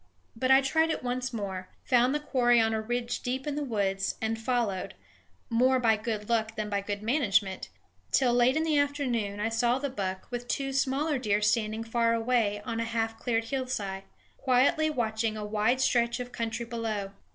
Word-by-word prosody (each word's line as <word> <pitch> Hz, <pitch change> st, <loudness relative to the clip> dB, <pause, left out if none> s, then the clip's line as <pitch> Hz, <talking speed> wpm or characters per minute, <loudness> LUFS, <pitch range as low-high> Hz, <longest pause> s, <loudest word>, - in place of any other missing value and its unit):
But 255 Hz, +3 st, -1 dB
I 265 Hz, +1 st, +7 dB
tried 320 Hz, +4 st, +2 dB
it 320 Hz, -, -2 dB
once 250 Hz, +1 st, -2 dB
more; 190 Hz, -5 st, -5 dB
found 250 Hz, +2 st, +3 dB
the -, -, +1 dB
quarry 245 Hz, -5 st, +3 dB
on 225 Hz, 0 st, +2 dB
a 220 Hz, -, 0 dB
ridge 240 Hz, +2 st, -2 dB
deep 260 Hz, +2 st, -3 dB
in 295 Hz, -, -2 dB
the 295 Hz, +1 st, -2 dB
woods, 195 Hz, -6 st, -1 dB
and 225 Hz, 0 st, -2 dB
followed 225 Hz, -6 st, -1 dB, 0.5 s
more 255 Hz, +3 st, +3 dB
by 225 Hz, -3 st, +4 dB
good 215 Hz, -1 st, -4 dB
luck 225 Hz, -1 st, 0 dB
than 210 Hz, -1 st, -4 dB
by 200 Hz, 0 st, 0 dB
good 205 Hz, +1 st, -4 dB
management 205 Hz, -7 st, +1 dB, 0.4 s
till, 250 Hz, -3 st, +3 dB
late 245 Hz, +4 st, +4 dB
in 315 Hz, -, +1 dB
the 310 Hz, -2 st, +2 dB
afternoon, 250 Hz, -8 st, -1 dB
I 215 Hz, +2 st, 0 dB
saw 240 Hz, +2 st, +2 dB
the 280 Hz, 0 st, -3 dB
buck 190 Hz, -5 st, -4 dB
with 245 Hz, 0 st, -4 dB
two 270 Hz, +1 st, -2 dB
smaller 275 Hz, +2 st, +1 dB
deer 210 Hz, -4 st, +1 dB
standing 215 Hz, 0 st, +1 dB
far 230 Hz, 0 st, +1 dB
away 225 Hz, -3 st, +1 dB
on 230 Hz, 0 st, -3 dB
a -, -, 0 dB
half 225 Hz, -1 st, -2 dB
cleared 230 Hz, -2 st, 0 dB
hillside, 225 Hz, -6 st, -3 dB, 0.3 s
quietly 265 Hz, +5 st, +3 dB
watching 220 Hz, -5 st, -1 dB
a 210 Hz, -, -4 dB
wide 215 Hz, +4 st, +1 dB
stretch 235 Hz, -2 st, +2 dB
of 245 Hz, 0 st, -6 dB
country 230 Hz, 0 st, -3 dB
below. 225 Hz, -4 st, -3 dB
235 Hz, 190 wpm, -28 LUFS, 215-255 Hz, 0.5 s, I